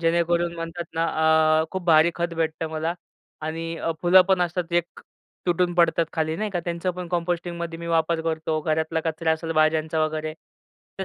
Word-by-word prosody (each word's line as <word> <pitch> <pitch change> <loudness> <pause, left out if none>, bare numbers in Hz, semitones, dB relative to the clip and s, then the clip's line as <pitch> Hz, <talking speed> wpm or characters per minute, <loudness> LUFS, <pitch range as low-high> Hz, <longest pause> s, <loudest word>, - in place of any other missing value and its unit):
जेणेकरून 170 +1 +1
म्हणतात 165 +1 -5
ना 165 - +1 0.6
अ, - - +1
खूप 190 -2 -4
भारी 165 0 +5
खत 170 0 -2
भेटतं 160 0 -2
मला 160 +2 -2 0.5
आणि 165 +1 -4
अ, 165 - -2
फुलंपण 185 +1 +5
असतात 175 0 -2
एक 175 0 -1 0.5
तुटून 175 0 +1
पडतात 170 -1 +3
खाली 160 0 -1
नाही 215 +1 -2
का, 175 -3 -2
त्यांचं 170 +1 -2
पण 180 -1 -7
कंपोस्टिंगमध्ये 170 -1 -3
मी 170 - -7
वापर 165 0 +1
करतो. 160 -1 -1
घरातला 160 +1 0
कचरा 160 0 0
असेल 165 0 -3
भाज्यांचा 155 0 +2
वगैरे 155 0 -3 0.7
तर 190 - -2
165 Hz, 170 wpm, -24 LUFS, 160-175 Hz, 0.7 s, भारी